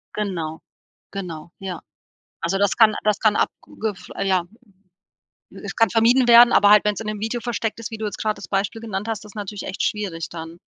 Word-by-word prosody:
Genau. 170 -7 -3 0.5
Genau. 170 -5 -7
Ja. 185 -3 -6 0.6
Also 195 +3 0
das 200 -1 +2
kann 220 -2 +6
das 210 -1 +2
kann 215 -2 +3
ab - - +3
Google 220 -1 -4
f 185 - -14
ja. 190 -3 +2 1.2
Es - - -6
kann 225 -2 +4
vermieden 240 +4 +4
werden, 235 +1 +8
aber 205 - +6
halt, 210 0 +7
wenn's 210 0 0
in 220 - -6
'nem 215 -1 -3
Video 225 +3 -2
versteckt 230 -2 -3
ist, 230 - -5
wie 225 - -5
du 220 - -4
jetzt 205 - -4
gerade 215 -1 0
das - - -10
Beispiel 200 +3 -2
genannt 210 -2 -4
hast, 225 -1 -3
das 210 - -12
ist - - -24
natürlich 205 -1 -6
echt 190 - -5
schwierig 190 -6 -2
dann. 165 0 -8
210 Hz, 215 wpm, -22 LUFS, 190-225 Hz, 1.2 s, werden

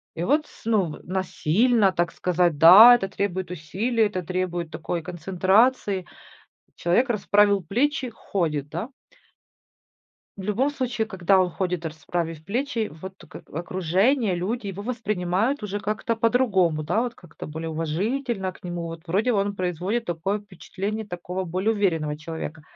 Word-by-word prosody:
И 165 - -3
вот 295 - +2
с - - -19
ну 215 -4 +2
в - - -18
насильно, 190 +4 +2
так 175 -2 0
сказать, 175 -3 +1
да, 200 +10 +10
это 195 -5 -2
требует 190 -2 -3
усилий, 200 +8 -1
это 185 -3 -3
требует 175 -1 -3
такой 170 0 -4
концентрации. 190 +4 +1 0.7
Человек 180 +10 +2
расправил 205 -2 +3
плечи, 255 - 0
ходит, 155 -9 -2
да. 175 - -5 1.5
В 195 - -7
любом 215 +8 +1
случае, 245 -6 -2
когда 190 -1 +2
он 180 - +1
ходит, 180 -1 -2
расправив 160 0 -4
плечи, 235 +1 -2
вот 190 0 -8
тут 170 - -17
ка - - -10
окружение, 185 - +1
люди 210 +5 -3
его 195 +1 -6
воспринимают 215 +1 -1
уже 205 0 -3
как-то 215 +4 -2
по-другому, 215 -9 +2
да, 175 +9 +1
вот 240 -1 -3
как-то 175 - -11
более 160 +2 -5
уважительно 190 - -2
к - - -19
нему. 175 -1 -4
Вот, 165 -1 -7
вроде, 210 +8 +1
он 200 -1 0
производит 185 +6 -2
такое 175 +4 -1
впечатление 205 +2 -6
такого 180 0 -4
более 185 +5 0
уверенного 165 -8 0
человека. 160 0 -7
190 Hz, 150 wpm, -24 LUFS, 175-220 Hz, 1.5 s, да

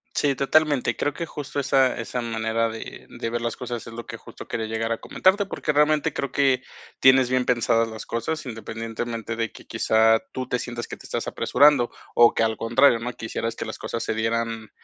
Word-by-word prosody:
Sí, 140 -2 +2
totalmente. 145 0 +2
Creo 145 - 0
que 170 - -4
justo 145 -2 -5
esa 135 -1 +2
esa 120 +2 -3
manera 115 0 -1
de 110 0 -9
de 115 - -5
ver 120 - -2
las 120 0 -3
cosas 120 -3 -5
es 115 - -9
lo 120 0 -7
que - - -7
justo - - -12
quería 110 -1 -3
llegar 110 +1 -2
a 115 - -1
comentarte, 195 - +2
porque 150 -6 -2
realmente 150 +1 +3
creo 140 -1 -3
que 135 -2 +2 0.4
tienes 130 -1 +5
bien 130 -1 +2
pensadas 115 -2 +2
las 110 -1 -8
cosas, 135 +7 -3
independientemente 115 0 -5
de 115 -2 -2
que - - -14
quizá 110 0 +3
tú 130 -1 -4
te 125 - -1
sientas 120 -1 -5
que - - -7
te - - -13
estás - - -3
apresurando 140 -2 +4 0.2
o 120 0 +6
que - - +2
al 110 0 0
contrario, 120 +1 +4
¿no? 125 +2 -4
Quisieras 115 0 -4
que - - -5
las - - -7
cosas 115 - -4
se - - -1
dieran 115 0 -2
120 Hz, 210 wpm, -24 LUFS, 115-135 Hz, 0.4 s, o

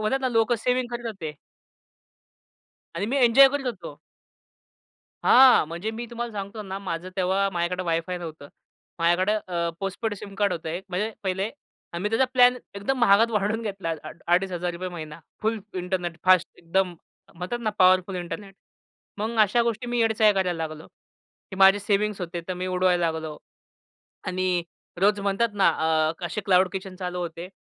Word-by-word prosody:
म्हणतात 240 +6 0
ना 260 - 0
लोकं 225 0 +2
सेव्हिंग 250 +2 0
करत 240 0 -4
होते. 170 -9 -5 1.6
आणि 190 +5 -2
मी 270 +5 -1
एन्जॉय 270 +4 +8
करीत 280 0 -3
होतो. 230 -6 -5 1.3
हां. 255 -10 +7
म्हणजे 170 +6 -4
मी 235 +2 -6
तुम्हाला 235 0 -5
सांगतो 200 +1 -6
ना 195 -1 -5
माझं 180 -2 -5
तेव्हा 190 +2 +1
माझ्याकडे 175 +1 -1
वाय 165 -1 +1
फाय 180 -1 -3
नव्हतं. 155 -4 -8 0.5
माझ्याकडे 175 +4 +2 0.2
अ, 170 -1 -1
पोस्टपेड 200 +3 -3
सिम 200 0 -10
कार्ड 200 -2 +1
होतं 165 -2 -5
एक 175 +4 -4
म्हणजे 205 +5 -1
पहिले. 190 +2 -1 0.4
आम्ही 190 +5 -2
त्याचा 225 +4 +3
प्लॅन 250 -1 +6 0.2
एकदम 230 +7 -2
महागात 225 0 +5
वाढवून 210 +1 0
घेतला. 195 -5 -4
आड 155 +1 -10
₹2500 180 0 0
महिना 155 -3 -8 0.2
फुल 220 +1 0 0.2
इंटरनेट, 180 -2 -3
फास्ट 185 -1 +5
एकदम 180 +1 0 0.4
म्हणतात 180 +8 -4
ना 215 - 0
पॉवरफुल 185 0 +4
इंटरनेट. 195 +3 -6 0.6
मग 220 +3 -3
अशा 215 +3 +4
गोष्टी 235 0 -2
मी 240 0 -1
येडे 225 -1 +2
चाळे 215 -1 +5
करायला 185 -3 0
लागलो. 155 0 -10 0.6
की 190 - -7
माझे 195 +1 +6
सेव्हिंग्स 205 0 0
होते. 175 0 -4
तर 185 - -2
मी 180 +1 -4
उडवायला 180 -2 +2
लागलो. 160 -1 -6 0.9
आणि 185 -1 0 0.4
रोज 205 +1 +3
म्हणतात 200 +4 +1
ना 200 - +4
अ, 160 0 +1
असे 190 +6 -4
क्लाउड 185 -1 +4
किचन 190 -1 -6
चालू 180 -1 -4
होते. 170 +1 -5
190 Hz, 165 wpm, -25 LUFS, 175-215 Hz, 1.6 s, एन्जॉय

